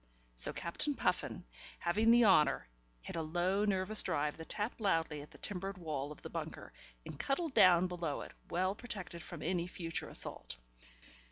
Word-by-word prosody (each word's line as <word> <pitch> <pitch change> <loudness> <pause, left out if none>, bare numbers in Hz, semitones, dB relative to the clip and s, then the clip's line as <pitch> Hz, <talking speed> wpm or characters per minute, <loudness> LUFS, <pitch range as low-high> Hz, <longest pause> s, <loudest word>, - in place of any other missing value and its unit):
So - - +8
Captain 280 - -2
Puffin, 180 - -1 0.3
having 210 +6 +2
the 235 0 +7
honour, 150 - +4 0.4
hit - - -6
a 165 - -1
low, 175 +6 +1
nervous 200 +1 +1
drive 150 +1 0
that 160 - -9
tapped 215 +2 -3
loudly 165 -7 +1
at 145 - -11
the - - -15
timbered 195 -1 -4
wall 150 -5 -4
of 150 - -11
the - - -6
bunker, - - -6 0.3
and - - -8
cuddled 300 +2 -1
down 185 -6 +7
below 170 -5 -3
it, - - -8 0.2
well 185 +2 +1
protected 200 -6 -7
from 165 -1 -8
any 175 +1 0
future 165 -2 -4
assault. - - -2
180 Hz, 170 wpm, -35 LUFS, 165-205 Hz, 0.4 s, So